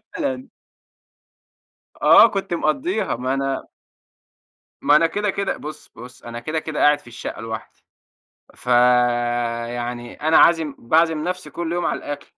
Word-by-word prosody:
فعلًا. 270 Hz, -4 st, -3 dB, 1.5 s
آه، 230 Hz, -, +8 dB
كنت 195 Hz, -4 st, -4 dB
مقضّيها 195 Hz, -, -1 dB
ما 130 Hz, +2 st, -2 dB
أنا 135 Hz, 0 st, -2 dB, 1.2 s
ما 145 Hz, -, +4 dB
أنا 165 Hz, +2 st, +5 dB
كده 205 Hz, +5 st, -2 dB
كده 200 Hz, 0 st, -2 dB
بُصّ 155 Hz, +1 st, -9 dB
بُصّ، 125 Hz, +1 st, -13 dB
أنا 120 Hz, 0 st, -7 dB
كده 155 Hz, +5 st, -3 dB
كده 155 Hz, -1 st, -5 dB
قاعد 145 Hz, 0 st, +4 dB
في -, -, -21 dB
الشقة 120 Hz, -1 st, -7 dB
لوحدي، 110 Hz, 0 st, -8 dB, 0.7 s
فيعني 120 Hz, -1 st, 0 dB
أنا 155 Hz, +2 st, +1 dB
عازم 160 Hz, -4 st, +4 dB
باعزم 160 Hz, +4 st, +1 dB
نفسي 180 Hz, +1 st, -4 dB
كل 170 Hz, -1 st, -4 dB
يوم 175 Hz, 0 st, -1 dB
على -, -, -1 dB
الأكل، 145 Hz, 0 st, -8 dB
145 Hz, 135 wpm, -21 LUFS, 120-170 Hz, 1.5 s, آه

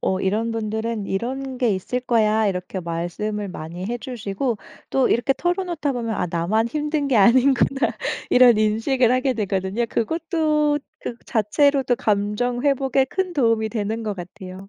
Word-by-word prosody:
어 190 Hz, 0 st, 0 dB
이런 220 Hz, +4 st, 0 dB
분들은 220 Hz, -1 st, -3 dB
"이런 260 Hz, +6 st, -3 dB
게 245 Hz, -3 st, +2 dB
있을 190 Hz, +7 st, -2 dB
거야." 220 Hz, -3 st, +2 dB
이렇게 190 Hz, 0 st, -3 dB
말씀을 180 Hz, +5 st, -3 dB
많이 175 Hz, +1 st, -7 dB
해 240 Hz, +2 st, -3 dB
주시고 230 Hz, -1 st, -3 dB, 0.3 s
또 265 Hz, -1 st, +2 dB
이렇게 240 Hz, +3 st, +2 dB
털어놓다 350 Hz, -4 st, -1 dB
보면 230 Hz, -3 st, -2 dB
'아 -, -, -1 dB
나만 195 Hz, +7 st, +1 dB
힘든 300 Hz, +1 st, -1 dB
게 260 Hz, -, +2 dB
아니구나.' 260 Hz, +5 st, +4 dB, 0.4 s
이런 245 Hz, -3 st, +6 dB
인식을 225 Hz, +4 st, +2 dB
하게 255 Hz, +1 st, +2 dB
되거든요. 200 Hz, +2 st, -1 dB
그것도 305 Hz, +3 st, 0 dB, 0.2 s
그 235 Hz, -, -5 dB
자체로도 260 Hz, +4 st, +2 dB
감정 210 Hz, +4 st, 0 dB
회복에 270 Hz, -1 st, +2 dB
큰 370 Hz, +5 st, -2 dB
도움이 230 Hz, -7 st, +1 dB
되는 220 Hz, 0 st, -2 dB
것 210 Hz, -1 st, -2 dB
같아요. 185 Hz, +1 st, -9 dB
230 Hz, 325 characters per minute, -22 LUFS, 205-265 Hz, 0.4 s, 이런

